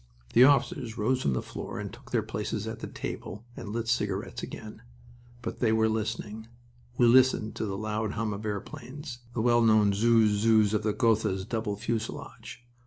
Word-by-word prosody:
The 120 - +8
officers 130 -4 +2
rose 125 +4 +1
from 70 - +1
the 65 - -2
floor - - -6
and - - -6
took - - -14
their - - +1
places - - -3
at - - -5
the - - -5
table, 105 +5 -6
and - - -7
lit 115 +2 -3
cigarettes 105 -2 -1
again. 110 0 -8 0.6
But - - -5
they 115 -3 +3
were 110 0 +3
listening. 110 0 -3 0.5
We 120 - +5
listened 125 -2 +4
to 110 - -2
the 95 -1 -3
loud 110 0 -2
hum 110 -1 -2
of 100 +2 -6
airplanes, 125 - -6 0.2
the 115 - 0
well 120 0 +4
known 110 -3 +5
"zooz 110 -1 +3
zooz" 110 -2 +4
of 105 - +2
the 105 -1 -1
Gothas' 110 -5 +1
double 110 -3 -2
fuselage. 115 +2 -5
110 Hz, 180 wpm, -28 LUFS, 105-120 Hz, 0.6 s, The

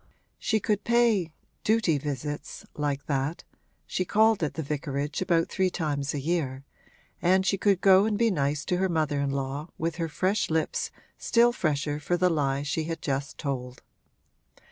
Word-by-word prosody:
She 220 - +1
could 210 0 0
pay 230 -8 +3 0.3
'duty 210 -9 +2
visits,' 145 +1 -5
like 145 -1 -2
that 140 +3 -2 0.4
(she 185 - -1
called 220 +2 +3
at 155 - -1
the 160 - -3
vicarage 145 +1 -3
about 170 -3 +2
three 190 -1 +1
times 150 -5 -2
a - - -1
year), 140 -3 -2 0.6
and 190 +2 +3
she 195 - +2
could 195 -1 +2
go 195 0 +6
and 215 -1 0
be 230 0 +3
nice 145 -3 0
to 180 - 0
her 190 +1 +1
mother 155 -4 0
in 140 0 0
law 140 +3 -3
with 165 +1 -2
her 165 -2 -2
fresh 190 +6 0
lips 160 0 0 0.3
still 235 +1 +4
fresher 150 - -1
for 175 +4 0
the 180 0 +3
lie 140 -3 0
she 150 +2 -2
had 165 0 -4
just 140 -1 -3
told. 125 -4 -4
160 Hz, 170 wpm, -27 LUFS, 140-190 Hz, 0.6 s, go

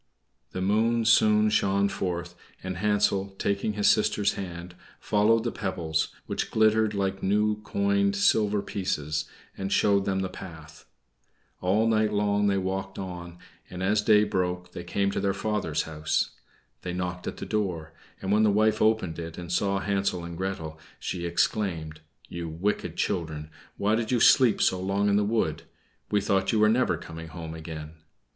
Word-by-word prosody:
The 95 - -4
moon 115 +3 +2
soon 105 -1 +5
shone 100 -1 +2
forth, 90 -3 -3 0.3
and 95 -1 -4
Hansel, 100 -1 +1
taking 100 +1 -1
his 105 -1 +1
sister's 105 -1 +3
hand, 90 -2 -7 0.3
followed 110 +2 +2
the 120 - -1
pebbles, 85 -5 -1 0.2
which - - -3
glittered 110 -1 +3
like 95 -1 -1
new 105 +2 +1
coined 200 - +1
silver 105 - +2
pieces, 75 -6 -2 0.3
and 95 0 -4
showed 100 -1 +3
them 95 -1 0
the 95 - -1
path. 80 -4 -11 0.8
All 100 +5 +2
night 110 -1 +2
long 105 0 +1
they 100 -1 +2
walked 95 +1 -3
on, 90 -2 -7 0.3
and 90 +1 -6
as 105 +2 +2
day 105 0 +5
broke 90 -3 -2
they 85 - -7
came 100 +3 0
to - - -2
their 100 -1 0
father's 100 -7 -1
house. 75 -1 -1 0.5
They 90 - -4
knocked 90 0 -4
at - - -4
the - - -6
door, 85 -7 -2 0.3
and 95 - -1
when 105 +1 +4
the 110 - +4
wife 110 +1 +2
opened 110 -7 +1
it 85 0 -7
and 90 -1 -7
saw 100 +2 +1
Hansel 95 -2 -1
and 85 0 -7
Gretel, 80 -4 -4 0.2
she 85 -2 -3
exclaimed, 85 -4 -1 0.3
"You 85 -1 -5
wicked 90 +6 -2
children! 80 -2 -2 0.3
why 105 +2 +1
did 110 +1 0
you 125 - +2
sleep 120 -1 +5
so 95 - +2
long 100 +2 +1
in 100 - +3
the 105 - +3
wood? 105 -7 0 0.5
We 105 -1 +2
thought 95 -1 +1
you 110 - +1
were 105 0 +5
never 110 -7 +2
coming 80 0 -9
home 80 -1 -7
again." 80 -1 -8
95 Hz, 170 wpm, -27 LUFS, 85-105 Hz, 0.8 s, soon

